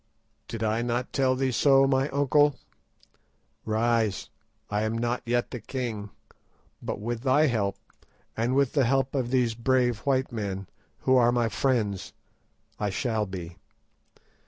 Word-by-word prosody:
"Did 115 -1 -5
I 110 +1 +1
not 120 +1 -2
tell 130 -1 +2
thee 130 0 0
so, 135 +2 +5
my 135 +1 +1
uncle? 145 +1 +3 1.1
Rise; 110 -2 0 0.4
I 105 0 -1
am 110 +1 -1
not 120 +1 -1
yet 120 0 0
the 125 - -5
king, 110 -3 -4 0.7
but - - -4
with 115 +2 -3
thy 140 +4 +4
help, 105 -8 0 0.6
and 120 +3 0
with 140 -2 +2
the 140 -4 +3
help 135 +2 +1
of 130 -4 -1
these 125 -3 +2
brave 120 0 +1
white 130 +2 0
men, 100 -4 -4 0.4
who 130 0 +4
are 120 -1 +5
my 120 -2 +1
friends, 100 -2 -1 0.7
I 105 - 0
shall 110 +1 -1
be. 90 -3 -7
120 Hz, 145 wpm, -27 LUFS, 110-130 Hz, 1.1 s, so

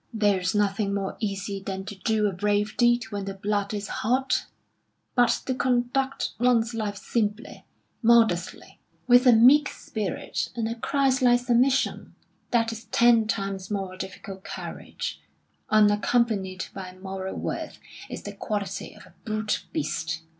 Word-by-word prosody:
"There 205 -4 +2
is 185 +2 -1
nothing 200 0 +1
more 195 -1 -3
easy 195 -2 -3
than 190 0 -5
to 205 - -6
do 210 +2 0
a 205 - +2
brave 205 +3 0
deed 240 0 +3
when 200 -1 -3
the 195 0 -5
blood 200 0 -1
is 205 -1 -4
hot. 260 +4 0 0.7
But 245 -2 +3
to 260 - 0
conduct 255 +1 0
one's 240 -1 +3
life 210 -3 -3
simply, 210 +2 -3 0.4
modestly, 225 -7 +2 0.3
with 245 +1 +6
a - - +9
meek 255 +6 +6
spirit 210 -4 -4
and 230 -2 -1
a 230 - -2
Christ 265 +2 +1
like 245 -1 +5
submission, 250 +2 +1 0.3
that 230 -1 +2
is 225 0 -8
ten 230 0 +4
times 195 -2 -3
more 195 -3 -3
difficult 190 0 -8
Courage, - - -6 0.5
unaccompanied 210 -2 +2
by 185 -1 -8
moral 190 0 -5
worth, - - -4 0.3
is - - -7
the - - -6
quality 205 -3 -4
of - - -14
a - - -19
brute 215 -1 -2
beast." 165 - -3
215 Hz, 145 wpm, -26 LUFS, 195-240 Hz, 0.7 s, a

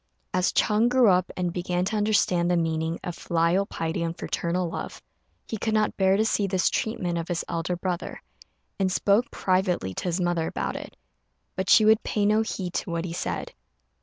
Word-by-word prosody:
As 185 0 +2
Ch'êng 215 +2 +3
grew 250 -3 +5
up, 185 -1 +2
and 180 -2 -1
began 180 0 -1
to 215 - -2
understand 205 -5 +2
the 175 - +2
meaning 160 0 -1
of 175 - -4
filial 170 +4 +1
piety 165 -1 -3
and 165 0 -3
fraternal 175 +1 -2
love, 170 - -6 0.5
he 220 - -4
could 220 +1 0
not 215 0 +1
bear 190 0 +3
to 220 - +2
see 205 -2 +1
this 185 -1 +1
treatment 180 -6 -1
of 165 - -5
his 175 -2 -2
elder 170 +1 -2
brother, 180 0 -4 0.6
and 190 -1 +1
spoke 205 +6 +2
privately 185 - 0
to - - -5
his 175 +1 0
mother 175 -2 0
about - - -3
it; - - -8 0.6
but 190 0 -2
she 215 - +7
would 220 +1 +5
pay 210 -1 -1
no 215 +1 +4
heed 190 -5 -4
to - - -3
what 170 0 -2
he 170 - -5
said. - - -4
180 Hz, 195 wpm, -26 LUFS, 170-205 Hz, 0.6 s, she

